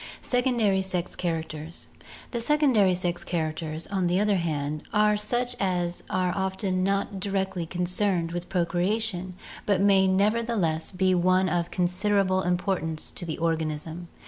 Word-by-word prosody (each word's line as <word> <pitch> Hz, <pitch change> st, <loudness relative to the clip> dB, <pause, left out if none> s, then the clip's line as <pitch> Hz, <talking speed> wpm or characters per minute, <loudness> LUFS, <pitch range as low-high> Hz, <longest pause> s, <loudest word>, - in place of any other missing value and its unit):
Secondary 240 Hz, -6 st, +2 dB
Sex 185 Hz, -2 st, -2 dB
Characters 160 Hz, -2 st, -4 dB, 0.5 s
The 235 Hz, -, -2 dB
secondary 240 Hz, -9 st, +3 dB
sex 175 Hz, -1 st, -2 dB
characters, 160 Hz, -1 st, -3 dB
on 190 Hz, -3 st, -1 dB
the 180 Hz, +2 st, +2 dB
other 205 Hz, -1 st, +2 dB
hand, 150 Hz, -3 st, -2 dB
are 210 Hz, 0 st, +4 dB
such 245 Hz, +4 st, 0 dB
as 175 Hz, -3 st, -1 dB
are 185 Hz, -1 st, 0 dB
often 190 Hz, -1 st, -1 dB
not 195 Hz, +1 st, 0 dB
directly 190 Hz, -3 st, -2 dB
concerned 180 Hz, 0 st, 0 dB
with 175 Hz, +1 st, -5 dB
procreation 185 Hz, +1 st, -1 dB, 0.3 s
but 200 Hz, -3 st, +3 dB
may 195 Hz, -1 st, +5 dB
never 205 Hz, +5 st, +3 dB
theless 175 Hz, -9 st, -1 dB
be 185 Hz, 0 st, +2 dB
of 180 Hz, -1 st, +2 dB
considerable 185 Hz, +1 st, +1 dB
importance 180 Hz, -3 st, -1 dB
to -, -, -7 dB
the 160 Hz, -, -4 dB
organism. 160 Hz, +1 st, -2 dB
185 Hz, 135 wpm, -26 LUFS, 170-200 Hz, 0.5 s, may